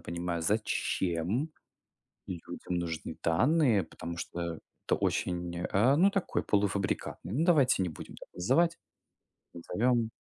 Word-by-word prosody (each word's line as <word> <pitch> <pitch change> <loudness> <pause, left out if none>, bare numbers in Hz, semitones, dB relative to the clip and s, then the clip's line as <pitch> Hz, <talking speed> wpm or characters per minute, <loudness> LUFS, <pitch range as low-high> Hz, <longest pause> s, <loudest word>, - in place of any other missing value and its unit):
понимаю, 85 -1 -3
зачем 100 - 0 0.8
людям 90 0 -5
нужны 80 -2 -4
данные, 115 - +3
потому 85 0 -7
что 85 -1 -4 0.3
это - - +2
очень, 85 -1 -1
э, 110 +10 +3
ну 190 +5 +6
такой, 195 -2 -1
полуфабрикатный. 100 -2 -1
Ну, 150 +7 +2
давайте 140 - +4
не 90 - -1
будем 80 - -9
так - - -12
называть, 160 - +2 0.8
назовем 115 +7 +1
95 Hz, 115 wpm, -30 LUFS, 85-130 Hz, 0.8 s, ну